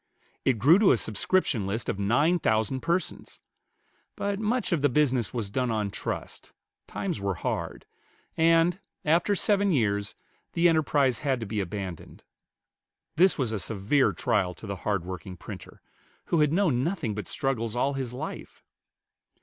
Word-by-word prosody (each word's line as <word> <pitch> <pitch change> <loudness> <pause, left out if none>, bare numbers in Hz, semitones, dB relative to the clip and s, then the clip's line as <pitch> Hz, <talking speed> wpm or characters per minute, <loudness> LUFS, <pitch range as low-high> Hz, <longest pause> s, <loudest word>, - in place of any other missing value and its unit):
It 130 -3 +3
grew 150 - +6
to 210 - +5
a - - +2
subscription 110 - 0
list 110 +4 -3
of 100 - -2
nine 145 - +2
thousand 110 -1 +1
persons; 170 +2 -2 0.8
but 200 0 -2
much 230 +2 0
of 170 -5 +1
the 145 - +3
business 130 -6 +1
was 110 -5 -4
done 125 +2 0
on 105 -3 -1
trust, - - -6 0.3
times - - -3
were 100 -1 -1
hard, - - -4 0.5
and, 165 +2 +3 0.3
after 170 +6 +3
seven 200 0 +2
years, 100 - 0 0.4
the 170 +1 +4
enterprise 145 -6 +2
had 135 -4 0
to - - -3
be 110 0 -3
abandoned. 95 -2 -6 0.9
This 185 +4 +4
was 130 -6 -1
a 110 - -2
severe 110 +8 +1
trial 90 -2 0
to - - -11
the 100 -2 -4
hard 100 -1 -2
working 95 0 -7
printer, - - -10 0.4
who 170 - +1
had 150 -1 +3
known 160 -9 +2
nothing 165 - -2
but 105 -2 -5
struggles 120 -6 -2
all 135 +3 +1
his 130 -3 -3
life. 125 - -7
130 Hz, 160 wpm, -27 LUFS, 105-165 Hz, 0.9 s, grew